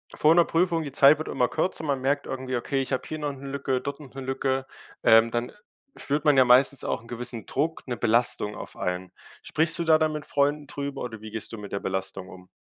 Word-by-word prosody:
vor 155 +2 +4
'ner 175 - +6
Prüfung, 165 -1 +1
die 145 - -6
Zeit 140 +2 +6
wird 155 - -5
immer 125 - +1
kürzer, 160 +1 -2
man 140 -3 -1
merkt 140 +2 0
irgendwie, 130 -1 -3
okay, 135 +3 -1
ich 135 - -4
habe 130 - -2
hier 155 - -4
noch 145 -1 -2
'ne 140 0 -9
Lücke, 135 -2 -1
dort 140 +1 -5
noch 135 -4 -13
'ne 135 - -7
Lücke, 135 0 -1 0.4
ähm, 115 +1 +6
dann 120 +1 -2 0.5
spürt 145 +2 -2
man 150 -2 +5
ja 130 - +8
meistens 130 +2 +5
auch - - -2
'n 115 - -17
gewissen 120 -1 -6
Druck, 155 +1 -2
'ne 120 - -2
Belastung 115 -3 +1
auf - - -9
einen. 90 0 -3 0.3
Sprichst 160 +2 0
du 170 - -1
da 160 -1 +6
dann 155 0 +1
mit 150 -1 -5
Freunden 145 +1 0
drüber 140 -1 -5
oder 110 -3 -7
wie 110 -1 -9
gehst 110 +1 -6
du - - -5
mit 105 -1 -9
der 100 - -2
Belastung 95 0 -4
um? 90 0 -13
135 Hz, 245 wpm, -26 LUFS, 120-145 Hz, 0.5 s, ja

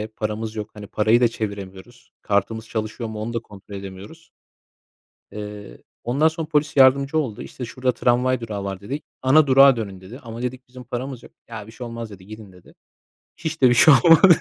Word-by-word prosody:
paramız 110 +1 -4
yok, 105 0 -5
hani 105 -1 -10
parayı 110 +3 +2
da 120 - +6
çeviremiyoruz. 100 +1 -7
Kartımız 110 +2 -1
çalışıyor 110 +1 -4
mu, 110 -1 -6
onu 115 +2 -4
da 115 - -1
kontrol 100 -2 -13
edemiyoruz. 100 - -10 1.0
Eee, 105 -8 -8 0.3
ondan 140 +7 +3
sonra 160 -1 -5
polis 150 -1 0
yardımcı 135 +3 +5
oldu. 125 -9 -3
İşte, 125 - -8
"Şurada 125 +2 -1
tramvay 125 +1 +1
durağı 105 -3 -5
var." 95 -1 -5
dedi. 135 +9 -5 0.2
"Ana 145 +3 +5
durağa 135 -1 +7
dönün." 100 -4 -5
dedi. 105 +8 -11
Ama 115 0 -8
dedik, 125 +1 -5
bizim 125 0 -12
paramız 125 +1 -5
yok. - - -15 0.2
Ya, 110 -3 -8
bir 110 - -13
şey 120 0 -8
olmaz 115 -1 -7
dedi, 95 -1 -13
gidin 110 -2 -11
dedi. 90 -1 -19 0.6
Hiç 160 -2 -5
de 130 - +7
bir 120 - +3
şey 150 +4 +8
olmadı. 170 +1 +8
115 Hz, 190 wpm, -22 LUFS, 105-130 Hz, 1.0 s, şey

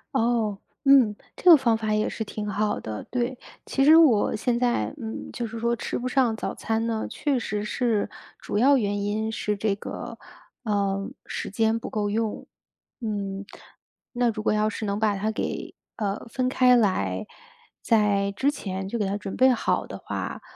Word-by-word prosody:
哦， 225 -4 +1 0.2
嗯， 265 -7 +6 0.2
这 365 - +4
个 330 - +12
方 235 -5 +2
法 215 -1 -1
也 215 0 +1
是 220 - -4
挺 210 0 -5
好 210 +1 0
的， 110 -1 -5
对。 250 0 -1 0.3
其 270 - +1
实 310 +2 +8
我 285 -11 +5
现 240 +2 0
在 245 +2 0
嗯， 225 -5 -6
就 235 - -4
是 225 +1 -7
说 235 +1 0
吃 - - -3
不 245 - -5
上 250 -3 +2
早 - - -4
餐 225 +1 -1
呢， 225 -1 -2
确 280 -4 0
实 210 -3 -3
是， 220 -1 0 0.3
主 - - -4
要 270 +5 +5
原 205 -3 -1
因 215 +2 -1
是 210 -1 -1
这 205 +1 0
个， 200 - -7 0.5
呃， 200 -3 0 0.2
时 - - -4
间 220 +2 +1
不 - - -6
够 205 -1 -1
用， 220 0 -2 0.6
嗯。 200 -3 -3 0.7
那 240 -1 +2
如 215 0 -5
果 210 - +2
要 215 0 +2
是 215 +1 -4
能 200 0 -1
把 210 -2 +2
它 210 +3 -1
给， 215 - -4 0.2
呃， 205 0 -3
分 255 +2 -1
开 250 -1 +5
来， 100 - +1 0.5
在 205 -3 +2
之 265 +8 +1
前 190 -9 -5
就 235 +4 -3
给 205 - 0
它 195 - -1
准 200 -1 -6
备 260 - +6
好 250 - +1
的 - - -7
话， - - -5
220 Hz, 200 characters per minute, -25 LUFS, 205-240 Hz, 0.7 s, 个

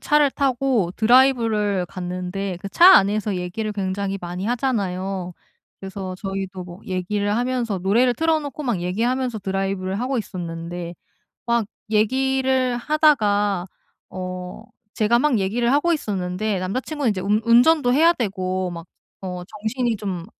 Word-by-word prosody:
차를 295 -2 +3
타고 260 - +1
드라이브를 225 -5 +3
갔는데 180 +2 -4
그 200 - -5
차 355 - +8
안에서 205 0 +1
얘기를 180 +5 -3
굉장히 195 0 -2
많이 180 +3 -5
하잖아요. 195 -7 -2 0.5
그래서 190 -1 -6
저희도 195 -1 -5
뭐 175 +1 -11
얘기를 205 +3 -1
하면서 240 -5 -1
노래를 235 +7 +2
틀어 320 +1 +1
놓고 290 +1 -6
막 235 -9 -1
얘기하면서 235 +6 -1
드라이브를 195 0 -2
하고 260 +1 -1
있었는데 170 -2 -6 0.5
막 235 -2 +1 0.2
얘기를 260 +3 +1
하다가 210 - +2 0.4
어 185 +1 -6 0.3
제가 230 +2 +2
막 260 -6 +2
얘기를 235 +6 0
하고 335 +5 +3
있었는데 195 - -2
남자 195 +8 -2
친구는 290 -7 -1
이제 185 -2 -3
운 210 +3 +1
운전도 245 +2 +5
해야 330 +4 +6
되고 185 - -2
막 170 -1 -8 0.4
어 180 -1 -5
정신이 220 +3 -2
좀 185 -4 -4
205 Hz, 315 characters per minute, -22 LUFS, 185-250 Hz, 0.5 s, 차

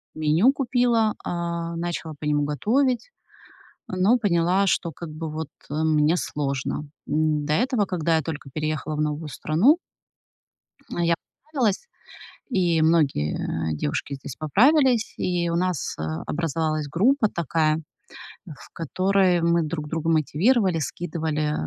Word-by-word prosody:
меню 155 - +4
купила, 245 -5 +2
а, 170 -1 -3
начала 170 -1 -4
по - - -6
нему 150 0 +2
готовить, 245 - 0 0.8
но 190 +6 +3
поняла, 185 -2 +2
что, 170 -2 +1
как 170 0 -8
бы, 155 +1 -5
вот, 155 0 -5 0.2
э, - - -5
мне 155 +1 +3
сложно. 140 -1 -3 0.2
М, 155 -1 +1
до 150 - 0
этого, 235 +2 +2
когда 170 -3 0
я - - +1
только 150 -2 -6
переехала 155 0 -2
в 150 - -1
новую 150 +1 -2
страну 180 - +3 1.1
я 170 -1 +1 0.4
поправилась, 245 - 0 0.6
и 175 -8 +2
многие 80 - +1
девушки 75 - -3
здесь 135 -1 -8
поправились, 245 - +3
и 175 -1 0
у 170 - -1
нас, 180 -3 -1
э, - - -3 0.3
образовалась 155 -1 -1
группа 215 - +3
такая, 160 -2 0 0.6
в 155 -7 -12
которой 185 +2 +2
мы 170 0 +3
друг 155 -1 -4
друга 165 0 -2
мотивировали, 175 - +2
скидывали 155 0 -2
165 Hz, 130 wpm, -24 LUFS, 155-190 Hz, 1.1 s, меню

